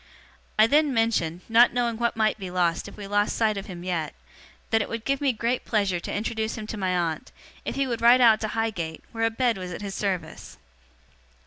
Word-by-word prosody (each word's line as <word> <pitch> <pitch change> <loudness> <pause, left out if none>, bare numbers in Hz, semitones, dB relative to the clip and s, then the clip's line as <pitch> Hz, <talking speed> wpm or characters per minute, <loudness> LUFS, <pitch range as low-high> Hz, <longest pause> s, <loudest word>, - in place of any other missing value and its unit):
I 215 - +7
then 290 +2 +3
mentioned 185 -7 0
not 235 +2 +5
knowing 240 -2 0
what 235 -1 -1
might 215 0 +1
be 190 -2 -5
lost 175 -1 0
if - - -12
we 205 - -7
lost 205 +1 +1
sight 220 -2 +1
of 195 +1 -6
him 175 -3 -8
yet 170 -4 -3 0.6
that 225 0 +3
it - - -4
would 230 -1 -5
give 275 0 0
me 280 -2 +3
great 235 +2 -1
pleasure 200 -5 0
to - - -6
introduce 220 +1 -2
him 215 - -5
to - - -4
my 190 -2 -1
aunt, 165 -3 -2 0.3
if - - -3
he 275 - +1
would 235 -3 -3
ride 240 +2 +7
out 225 -3 +6
to 215 - -1
Highgate, 210 -8 -3
where 225 -1 -1
a - - +3
bed 230 -2 0
was 180 -1 -6
at 180 - -6
his 200 -1 -5
service. 195 -3 -4
220 Hz, 225 wpm, -25 LUFS, 185-230 Hz, 0.6 s, I